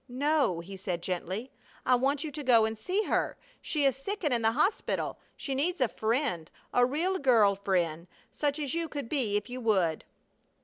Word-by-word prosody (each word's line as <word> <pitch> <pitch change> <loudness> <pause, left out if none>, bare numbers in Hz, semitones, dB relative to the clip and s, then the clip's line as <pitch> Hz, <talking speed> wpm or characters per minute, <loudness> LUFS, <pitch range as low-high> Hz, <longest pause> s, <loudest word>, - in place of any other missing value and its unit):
"No," 275 - +1
he 195 +3 -9
said, 180 -2 -4
gently. 185 +7 -3 0.3
"I 255 - +4
want 270 +4 +2
you 310 - -4
to 295 0 -5
go 235 -4 +5
and 220 0 -2
see 370 - -1
her. - - 0 0.2
She 295 -3 0
is 270 - +3
sick 390 +10 -5
and 295 -5 +2
in 235 - +1
the 225 0 +3
hospital. 310 - 0 0.2
She 275 - -3
needs 335 +7 0
a 255 - +3
friend, 220 - -1 0.2
a 245 - +4
real 345 +8 0
girl 230 -7 +5
friend, 175 -4 -1 0.2
such 290 -1 -1
as 285 -4 -3
you 335 0 -1
could 285 -5 -5
be 230 -7 +1
if 210 - -4
you 250 0 -6
would." 190 -8 +1
250 Hz, 195 wpm, -29 LUFS, 200-290 Hz, 0.3 s, go